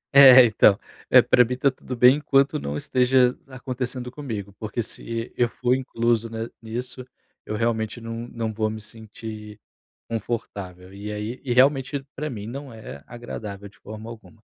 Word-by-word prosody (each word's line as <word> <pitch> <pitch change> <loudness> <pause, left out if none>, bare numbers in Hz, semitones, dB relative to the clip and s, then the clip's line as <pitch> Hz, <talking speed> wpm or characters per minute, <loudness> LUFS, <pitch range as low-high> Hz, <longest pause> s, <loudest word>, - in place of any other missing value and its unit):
É, 130 -2 +10
então, 105 -3 +4 0.3
eh, - - +8
para 125 - +5
mim 125 +2 -3
está 135 +2 +2
tudo 130 -1 -7
bem 125 +4 +7
enquanto 140 -2 +2
não 70 +1 -4
esteja 125 - +3
acontecendo 125 -1 -5
comigo, 110 -9 -6
porque 110 +2 -3
se 115 +1 -6
eu 120 -1 +2
for 125 +1 0
incluso, 115 -3 0
né, 115 0 -4
nisso, 125 +3 -6 0.4
eu 110 - -4
realmente 115 0 -1
não 115 +1 -6
não 115 -2 -4
vou 110 0 0
me 110 0 -6
sentir 110 0 -9 0.5
confortável 100 -5 -5
e 105 +1 -6
aí 105 +4 -5
e 130 - -3
realmente 135 +2 +3
para 150 +2 -3
mim 105 -5 -6
não 135 +4 -7
é 110 -11 -10
agradável 105 -4 -7
de 100 - -20
forma 110 +1 -9
alguma. 115 -1 -12
115 Hz, 165 wpm, -24 LUFS, 110-125 Hz, 0.5 s, É